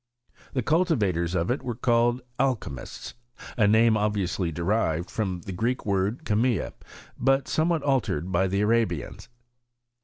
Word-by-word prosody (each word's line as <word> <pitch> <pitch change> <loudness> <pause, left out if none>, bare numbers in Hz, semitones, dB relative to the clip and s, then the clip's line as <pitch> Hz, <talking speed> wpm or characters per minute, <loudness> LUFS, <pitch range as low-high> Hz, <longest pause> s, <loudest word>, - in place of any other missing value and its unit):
The 130 - -1
cultivators 105 - +1
of 85 +5 0
it 130 - -1
were 120 -2 -4
called 120 +1 +2 0.2
Alchymuttt 115 - -3 0.4
a 110 -4 +3
name 110 +1 +5
obviously 100 -4 0
derived 85 0 -1
from 95 -5 -2
the 95 - -7
Greek 115 +8 -1
word 100 +7 -1
cAe 105 - 0
mta, 115 -1 +1 0.5
but 135 +2 +2
somewhat 160 -1 +1
altered 115 - 0
by 95 +2 +2
the 100 +2 0
Arabians. 105 - 0
110 Hz, 140 wpm, -26 LUFS, 95-125 Hz, 0.5 s, name